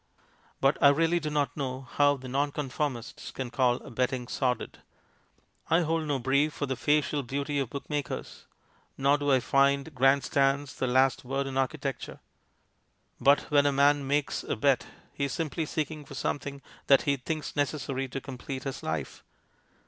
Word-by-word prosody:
But 135 Hz, +2 st, +2 dB
I -, -, +8 dB
really 165 Hz, +4 st, +3 dB
do 155 Hz, -2 st, -3 dB
not 145 Hz, -1 st, 0 dB
know 130 Hz, -2 st, -3 dB
how 145 Hz, +2 st, +2 dB
the 130 Hz, 0 st, -9 dB
Nonconformists 140 Hz, -2 st, -2 dB
can 130 Hz, -2 st, -5 dB
call 125 Hz, -2 st, +2 dB
bet 125 Hz, +2 st, +1 dB
ting 125 Hz, -2 st, -4 dB
sordid. 125 Hz, -1 st, -2 dB, 0.9 s
I 165 Hz, +2 st, +4 dB
hold 165 Hz, -1 st, 0 dB
no 145 Hz, -2 st, +1 dB
brief 140 Hz, +4 st, +1 dB
for 145 Hz, -, -2 dB
the 135 Hz, -1 st, -2 dB
facial 150 Hz, +2 st, +1 dB
beauty 140 Hz, +3 st, -2 dB
of 135 Hz, -4 st, -2 dB
bookmakers, 145 Hz, +1 st, -5 dB, 0.5 s
nor 140 Hz, +1 st, +3 dB
do 145 Hz, 0 st, +1 dB
I 130 Hz, -, +5 dB
find 140 Hz, +4 st, +2 dB
grand 135 Hz, +1 st, +4 dB
stands 140 Hz, 0 st, +1 dB
the 130 Hz, -, -2 dB
last 130 Hz, +1 st, +3 dB
word 135 Hz, +2 st, -2 dB
in 135 Hz, -1 st, -5 dB
architecture; 135 Hz, +1 st, -2 dB, 1.0 s
but 140 Hz, +1 st, +5 dB
when 145 Hz, -1 st, +5 dB
a -, -, +3 dB
man 140 Hz, 0 st, +3 dB
makes 145 Hz, 0 st, 0 dB
a -, -, -2 dB
bet 135 Hz, +3 st, +2 dB, 0.3 s
he 140 Hz, -, -1 dB
is 140 Hz, -, -3 dB
simply 160 Hz, -1 st, -2 dB
seek 155 Hz, 0 st, -2 dB
ing 155 Hz, -1 st, -8 dB
for 135 Hz, -, -10 dB
something 140 Hz, +1 st, -3 dB, 0.2 s
that 135 Hz, -1 st, +6 dB
he 140 Hz, -, +2 dB
thinks 155 Hz, +3 st, -4 dB
necessary 135 Hz, -2 st, -1 dB
to 135 Hz, +2 st, -5 dB
complete 130 Hz, 0 st, -7 dB
his 135 Hz, -1 st, -5 dB
life. 80 Hz, -4 st, -4 dB
140 Hz, 170 wpm, -28 LUFS, 130-145 Hz, 1.0 s, I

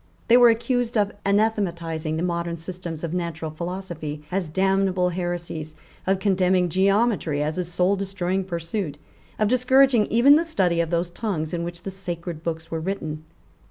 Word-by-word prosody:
They 240 Hz, -, +8 dB
were 245 Hz, -1 st, +8 dB
accused 240 Hz, +1 st, 0 dB
of 205 Hz, -1 st, +2 dB, 0.2 s
anathematizing 170 Hz, -7 st, 0 dB
the 165 Hz, -, -1 dB
modern 170 Hz, -1 st, -2 dB
systems 170 Hz, -1 st, -6 dB
of 170 Hz, 0 st, -3 dB
natural 165 Hz, -3 st, -3 dB
philosophy 170 Hz, -3 st, -5 dB
as 180 Hz, -3 st, -1 dB
damnable 190 Hz, +1 st, +2 dB
heresies, 175 Hz, -3 st, -4 dB, 0.3 s
of 195 Hz, 0 st, +3 dB
condemning 185 Hz, -2 st, +2 dB
geometry 195 Hz, -4 st, +2 dB
as 155 Hz, +4 st, -2 dB
a -, -, +1 dB
souldestroying 190 Hz, +1 st, 0 dB
pursuit, 170 Hz, -2 st, -3 dB, 0.4 s
of 215 Hz, -, +2 dB
discouraging 255 Hz, -1 st, +4 dB
even 270 Hz, +6 st, +6 dB
the 330 Hz, -, +2 dB
study 185 Hz, -, +1 dB
of 165 Hz, -, -2 dB
those 170 Hz, 0 st, -1 dB
tongues 175 Hz, -6 st, -3 dB
in 170 Hz, -1 st, -1 dB
which 170 Hz, 0 st, -6 dB
the 195 Hz, -, -4 dB
sacred 175 Hz, -3 st, -5 dB
books 165 Hz, 0 st, -4 dB
were 165 Hz, -, -2 dB
written. 155 Hz, -4 st, -4 dB
180 Hz, 160 wpm, -24 LUFS, 165-200 Hz, 0.4 s, They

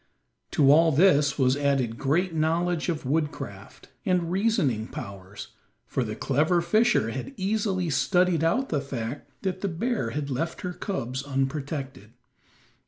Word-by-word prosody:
To 140 Hz, -2 st, +5 dB
all 165 Hz, +2 st, +6 dB
this 145 Hz, -3 st, +4 dB
was 130 Hz, -2 st, +3 dB
added 135 Hz, -5 st, 0 dB
great 165 Hz, +6 st, +1 dB
knowledge 165 Hz, +2 st, 0 dB
of 155 Hz, -5 st, -3 dB
woodcraft, 150 Hz, +3 st, -4 dB
and 180 Hz, -5 st, 0 dB
reasoning 185 Hz, -, +1 dB
powers, 100 Hz, 0 st, -8 dB, 0.4 s
for 130 Hz, -, -1 dB
the 110 Hz, -2 st, -4 dB
clever 155 Hz, +9 st, +2 dB
fisher 175 Hz, -, +2 dB
had 135 Hz, -, -6 dB
easily 190 Hz, -3 st, 0 dB
studied 175 Hz, +4 st, +2 dB
out 255 Hz, +12 st, +1 dB
the 150 Hz, -3 st, 0 dB
fact 135 Hz, 0 st, -5 dB
that 185 Hz, -1 st, -2 dB
the 200 Hz, -, 0 dB
bear 200 Hz, -, -1 dB
had 140 Hz, +3 st, -4 dB
left 155 Hz, +6 st, -3 dB
her 180 Hz, -1 st, -4 dB
cubs 130 Hz, -, -3 dB
unprotected. 135 Hz, -4 st, -3 dB
155 Hz, 140 wpm, -26 LUFS, 135-180 Hz, 0.4 s, all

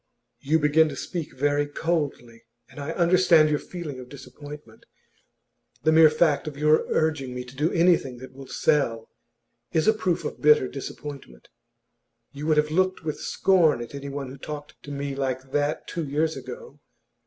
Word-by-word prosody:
'You 155 Hz, +4 st, +2 dB
begin 155 Hz, +1 st, +4 dB
to 140 Hz, -, -6 dB
speak 165 Hz, +3 st, -5 dB
very 145 Hz, +1 st, +1 dB
coldly. 145 Hz, -7 st, -3 dB, 0.3 s
And -, -, -11 dB
I 140 Hz, +2 st, -5 dB
understand 170 Hz, -3 st, +4 dB
your 150 Hz, -, +1 dB
feeling 160 Hz, -7 st, -7 dB
of 125 Hz, -1 st, -10 dB
disappointment. 140 Hz, -2 st, -12 dB, 1.0 s
The 155 Hz, -, +4 dB
mere 160 Hz, 0 st, +7 dB
fact 155 Hz, -2 st, +1 dB
of 145 Hz, -2 st, -6 dB
your 150 Hz, +1 st, +3 dB
urging 150 Hz, -5 st, 0 dB
me 125 Hz, -, -4 dB
to 125 Hz, +1 st, -13 dB
do 150 Hz, +5 st, 0 dB
anything 165 Hz, -7 st, +2 dB
that 130 Hz, +2 st, -11 dB
will 135 Hz, 0 st, -11 dB
sell 120 Hz, -9 st, 0 dB, 0.6 s
is 160 Hz, -1 st, +2 dB
a 220 Hz, -, +6 dB
proof 185 Hz, -6 st, -1 dB
of -, -, -5 dB
bitter 150 Hz, -3 st, +5 dB
disappointment. 135 Hz, -, -9 dB, 0.8 s
You 145 Hz, +2 st, -6 dB
would 155 Hz, -1 st, +3 dB
have 150 Hz, 0 st, +2 dB
looked 185 Hz, +2 st, +1 dB
with 155 Hz, -2 st, -4 dB
scorn 175 Hz, -9 st, +3 dB
at 120 Hz, +2 st, -8 dB
anyone 140 Hz, -1 st, -5 dB
who 135 Hz, +1 st, -11 dB
talked 150 Hz, +1 st, -7 dB
to 145 Hz, -, -10 dB
me 140 Hz, 0 st, -3 dB
like 130 Hz, -1 st, -3 dB
that 145 Hz, +1 st, -1 dB
two 170 Hz, -, -3 dB
years 155 Hz, +3 st, 0 dB
ago. 475 Hz, 0 st, -9 dB
150 Hz, 170 wpm, -25 LUFS, 135-160 Hz, 1.0 s, mere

